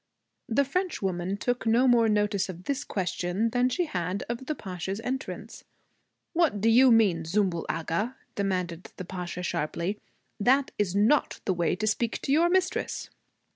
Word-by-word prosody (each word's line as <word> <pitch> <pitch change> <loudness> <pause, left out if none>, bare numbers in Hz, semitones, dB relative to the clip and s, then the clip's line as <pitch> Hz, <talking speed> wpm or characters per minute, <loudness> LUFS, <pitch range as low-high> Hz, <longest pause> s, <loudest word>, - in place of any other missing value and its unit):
The 275 +5 +3
Frenchwoman 200 - -2
took 245 +1 -1
no 240 +4 +4
more 235 -2 +5
notice 210 -2 +1
of 180 -1 -7
this 280 +4 -2
question 190 +2 -1
than 250 +1 +2
she 350 +7 0
had 180 - -2
of 240 +2 -5
the 305 - -1
Pasha's 190 - -5
entrance. 260 +3 -5 0.7
'What 325 - +2
do 225 +3 +3
you 250 +3 +7
mean, 200 -8 +4
Zümbül 175 0 0
Agha?' 170 +10 -1 0.2
demanded 185 -3 -2
the 185 - -6
Pasha 180 0 -5
sharply. 170 +5 -2 0.4
'That 265 +6 +3
is 195 -3 0
not 220 +9 +3
the 190 - +2
way 175 -1 +1
to 215 - -2
speak 225 +2 0
to - - -1
your 330 +4 +4
mistress.' 370 +1 0
210 Hz, 160 wpm, -27 LUFS, 180-250 Hz, 0.7 s, you